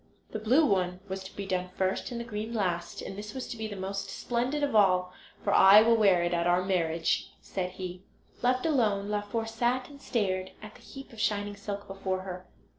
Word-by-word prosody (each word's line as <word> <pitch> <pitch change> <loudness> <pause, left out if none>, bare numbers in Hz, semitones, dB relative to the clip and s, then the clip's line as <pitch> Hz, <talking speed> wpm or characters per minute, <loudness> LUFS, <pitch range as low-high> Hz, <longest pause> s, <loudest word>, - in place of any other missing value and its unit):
The 220 - -3
blue 255 +9 +4
one 180 -6 +1
was 190 0 -5
to 190 - -11
be 200 - -4
done 185 -1 -2
first 190 0 0
and 240 - -4
the - - -3
green 220 +1 -4
last, 175 -5 -2
and 195 - -6
this 210 +3 -7
was 260 - -4
to - - -4
be 220 -1 -4
the 205 - -6
most 195 +1 -4
splendid 250 +5 -1
of 280 -5 0
all, 185 -3 +4 0.3
"for - - +1
I 200 +3 +9
will 230 +1 +5
wear 195 -6 +4
it 175 0 0
at 170 0 +1
our 175 +1 +3
marriage," 170 -3 0
said 180 -1 -4
he. 185 -1 -6 0.4
Left 255 +2 +2
alone, 215 -10 +1
Laufer 210 +2 -2
sat 240 +3 -1
and 280 -1 -13
stared 190 -7 -1
at 215 0 -10
the - - -17
heap 270 -3 -11
of 220 - -6
shining 205 -1 0
silk 200 0 -6
before 190 -1 -3
her. 185 -1 -7
200 Hz, 215 wpm, -29 LUFS, 185-225 Hz, 0.4 s, I